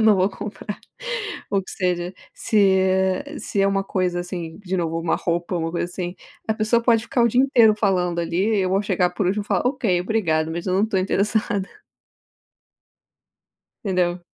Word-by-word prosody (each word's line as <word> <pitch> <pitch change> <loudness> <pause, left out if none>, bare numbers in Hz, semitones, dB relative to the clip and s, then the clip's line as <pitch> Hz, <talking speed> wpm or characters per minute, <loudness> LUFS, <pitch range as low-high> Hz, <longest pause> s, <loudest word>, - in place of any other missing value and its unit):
não 220 -2 +5
vou 185 +1 +3
comprar 210 +1 -7 0.7
o 195 -1 +1
que - - -10
seja, 180 -1 -1 0.2
se 200 -3 +3
é 190 +10 0
se 200 - -2
é 195 - +4
uma 195 0 0
coisa 180 -2 -1
assim 175 -2 -6
de 190 -1 -4
novo, 165 -2 -1
uma 165 0 0
roupa, 175 +1 -2
uma 165 -1 -2
coisa 170 - -1
assim, 180 0 -5 0.3
a 220 - +2
pessoa 220 +2 +2
pode 230 -2 +3
ficar 245 - +1
o 235 - +5
dia 245 +3 +3
inteiro 235 -5 +5
falando 180 -5 +1
ali. 190 +6 0
Eu 185 -1 +1
vou 195 +1 +2
chegar 180 -3 +1
por 180 +2 -2
último 205 +3 0
falar 225 - 0
ok, 220 -10 0
obrigado, 165 -6 0
mas 170 +3 -4
eu 185 - 0
não 195 - +3
estou 210 -3 0
interessada. 200 +1 0 2.2
Entendeu. 180 -2 +1
190 Hz, 180 wpm, -22 LUFS, 175-210 Hz, 2.2 s, não